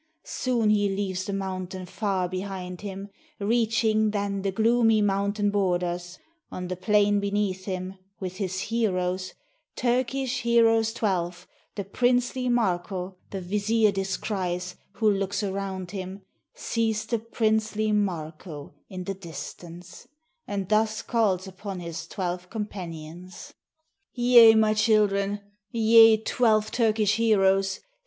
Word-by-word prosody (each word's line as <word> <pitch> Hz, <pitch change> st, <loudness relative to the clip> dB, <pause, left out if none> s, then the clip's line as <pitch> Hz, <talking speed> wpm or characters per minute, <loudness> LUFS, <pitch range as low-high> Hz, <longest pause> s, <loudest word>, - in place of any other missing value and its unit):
Soon 235 Hz, -4 st, 0 dB
he 205 Hz, -1 st, +2 dB
leaves 190 Hz, -1 st, -2 dB
the 200 Hz, -, -4 dB
mountain 185 Hz, -1 st, -4 dB
far 190 Hz, -1 st, -1 dB
behind 185 Hz, -1 st, -5 dB
him: 200 Hz, 0 st, -6 dB, 0.3 s
Reaching 220 Hz, 0 st, +2 dB
then 200 Hz, -1 st, -2 dB
the 195 Hz, 0 st, -1 dB
gloomy 225 Hz, +1 st, +3 dB
mountain 200 Hz, 0 st, +1 dB
borders; 180 Hz, -2 st, -1 dB, 0.3 s
On 180 Hz, -1 st, -6 dB
the 185 Hz, -, -2 dB
plain 205 Hz, +1 st, +3 dB
beneath 200 Hz, -2 st, -1 dB
him, 185 Hz, 0 st, -5 dB, 0.2 s
with 185 Hz, -1 st, -5 dB
his 185 Hz, -2 st, -2 dB
heroes 185 Hz, -5 st, -1 dB, 0.2 s
— -, -, -47 dB
Turkish 255 Hz, +1 st, 0 dB
heroes 225 Hz, -1 st, +3 dB
twelve, 180 Hz, -5 st, -2 dB, 0.3 s
the 200 Hz, -, -3 dB
princely 245 Hz, +4 st, +1 dB
Marko 185 Hz, -4 st, -1 dB
The 195 Hz, -, -5 dB
vizier 210 Hz, +3 st, +2 dB
descries, 185 Hz, -2 st, -3 dB, 0.2 s
who 220 Hz, +1 st, 0 dB
looks 200 Hz, 0 st, 0 dB
around 190 Hz, -2 st, -4 dB
him, 190 Hz, 0 st, -6 dB, 0.3 s
Sees 225 Hz, -, -1 dB
the 235 Hz, -, -1 dB
princely 215 Hz, -1 st, 0 dB
Marko 160 Hz, -6 st, -3 dB, 0.2 s
in 185 Hz, -2 st, -6 dB
the 195 Hz, -, -3 dB
distance, 175 Hz, +2 st, -10 dB, 0.4 s
And 195 Hz, -2 st, -3 dB
thus 215 Hz, +1 st, +1 dB
calls 205 Hz, -6 st, +1 dB
upon 190 Hz, 0 st, -7 dB
his 170 Hz, -1 st, -6 dB
twelve 180 Hz, -2 st, -4 dB
companions: 180 Hz, -5 st, -7 dB, 0.6 s
"Ye, 240 Hz, -2 st, +7 dB
my 215 Hz, -1 st, +4 dB
children! 205 Hz, -2 st, +2 dB, 0.3 s
ye, 225 Hz, 0 st, +6 dB
twelve 220 Hz, -1 st, +1 dB
Turkish 215 Hz, -3 st, +2 dB
heroes! 195 Hz, -4 st, +2 dB
200 Hz, 120 wpm, -26 LUFS, 185-220 Hz, 0.6 s, Ye